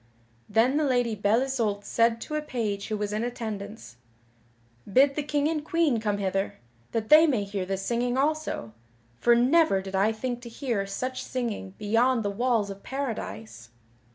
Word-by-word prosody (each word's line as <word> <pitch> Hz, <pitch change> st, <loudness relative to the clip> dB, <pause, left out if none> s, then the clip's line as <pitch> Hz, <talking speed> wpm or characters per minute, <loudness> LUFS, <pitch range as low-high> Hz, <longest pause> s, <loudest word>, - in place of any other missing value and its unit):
Then 230 Hz, +6 st, +3 dB
the 310 Hz, -, +2 dB
Lady 245 Hz, -4 st, +1 dB
Belle 210 Hz, +3 st, +2 dB
Isoult 225 Hz, -7 st, -1 dB
said 230 Hz, +1 st, +2 dB
to -, -, -6 dB
a 305 Hz, -, 0 dB
page 220 Hz, -8 st, -3 dB
who 215 Hz, -, -2 dB
was 210 Hz, 0 st, -3 dB
in 215 Hz, +2 st, -1 dB
attendance: 215 Hz, -, -6 dB, 0.9 s
"Bid 275 Hz, +6 st, +5 dB
the 300 Hz, -, -2 dB
King 290 Hz, 0 st, 0 dB
and 310 Hz, -2 st, -1 dB
Queen 315 Hz, -6 st, +1 dB
come 210 Hz, -2 st, -1 dB
hither, 195 Hz, 0 st, -1 dB, 0.4 s
that 220 Hz, -1 st, -2 dB
they 310 Hz, +2 st, +8 dB
may 245 Hz, -9 st, +1 dB
hear 195 Hz, -2 st, -4 dB
this 195 Hz, 0 st, -3 dB
singing 245 Hz, +2 st, 0 dB
also, 295 Hz, -, -1 dB, 0.5 s
for 240 Hz, 0 st, +5 dB
never 260 Hz, -2 st, +4 dB
did 190 Hz, 0 st, -7 dB
I 200 Hz, +3 st, +3 dB
think 245 Hz, +2 st, -4 dB
to 240 Hz, -, -9 dB
hear 230 Hz, -5 st, -2 dB
such 255 Hz, +6 st, -4 dB
singing 220 Hz, -6 st, -4 dB
beyond 230 Hz, +3 st, +2 dB
the 205 Hz, -, -1 dB
walls 225 Hz, -2 st, 0 dB
of 195 Hz, 0 st, -10 dB
Paradise." 115 Hz, -, -5 dB
230 Hz, 175 wpm, -27 LUFS, 200-260 Hz, 0.9 s, they